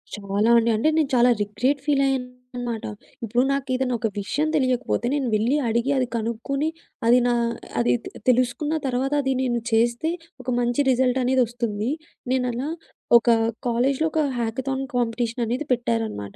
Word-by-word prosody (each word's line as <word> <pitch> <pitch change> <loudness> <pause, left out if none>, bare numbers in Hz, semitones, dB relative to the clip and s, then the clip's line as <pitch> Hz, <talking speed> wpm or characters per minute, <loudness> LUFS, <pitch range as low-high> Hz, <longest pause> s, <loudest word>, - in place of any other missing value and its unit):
చాలా 205 +2 0
అండి. 230 0 +3
అంటే 265 +8 +2
నేను 305 -4 +2
చాలా 245 0 +5
రిగ్రెట్ 250 +7 0
ఫీల్ 285 -2 +2
అయ్యానన్నమాట. 250 -3 -4 0.4
ఇప్పుడు 240 +3 +1
నాకేఏదైనా 260 -2 -1
ఒక 225 - 0
విషయం 290 +10 -1
తెలియకపోతే 255 -3 0
నేను 275 -3 -1
వెళ్ళి 235 +7 +2
అడిగి 235 +4 +1
అది 255 -1 +1
కనుక్కొని 235 +6 -2 0.4
అది 245 +2 +6
నా 245 - +2 0.5
అది 120 +1 +3
తె - - -7 0.2
తెలుసుకున్న 255 +4 +1
తర్వాత 265 +2 -1
అది 265 -1 0
నేను 245 -2 0
చేస్తే 235 +7 +2 0.3
ఒక 255 - -5
మంచి 245 +3 +1
రిజల్టనేది 255 0 +2
ఒస్తుంది. 230 -2 -3 0.4
నేనలా 250 +1 -1 0.5
ఒక 235 - -18 0.4
కాలేజీలో 260 +6 +1
ఒక 315 - +2 0.2
హ్యాకథాన్ 265 +4 -2
కాంపిటీషన్ 235 0 -1
అనేది 250 +6 -2
పెట్టారన్నమాట. 225 - -2
245 Hz, 145 wpm, -23 LUFS, 230-265 Hz, 0.5 s, అది